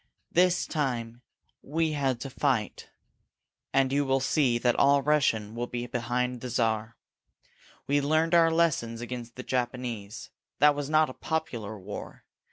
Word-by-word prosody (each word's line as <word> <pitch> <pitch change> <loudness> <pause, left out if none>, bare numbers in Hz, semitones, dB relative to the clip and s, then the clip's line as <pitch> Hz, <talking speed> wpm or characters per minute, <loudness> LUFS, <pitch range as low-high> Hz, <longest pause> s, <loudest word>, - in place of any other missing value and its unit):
This 180 +1 +3
time 120 -6 -3 0.4
we 160 +2 -1
had 135 -5 0
to 135 - -5
fight, 125 -6 -1 0.8
and 135 0 +2
you 145 +1 +2
will 135 -1 +1
see 135 -2 +2
that 120 0 +2
all 140 0 +4
Russia 150 -7 +3
will 120 +1 -3
be 120 0 -4
behind 125 0 -2
the 125 - -5
Czar. 115 -1 -1 0.9
We 145 +1 +2
learned 155 +3 +1
our 165 -1 +6
lessons 155 -9 +1
against 120 -1 -6
the 130 - -7
Japanese. 120 -4 -4 0.3
That 150 +1 +6
was 145 -1 -4
not 155 -2 +3
a - - -10
popular 120 -11 -4
war. 100 +2 -8
130 Hz, 150 wpm, -28 LUFS, 120-145 Hz, 0.9 s, our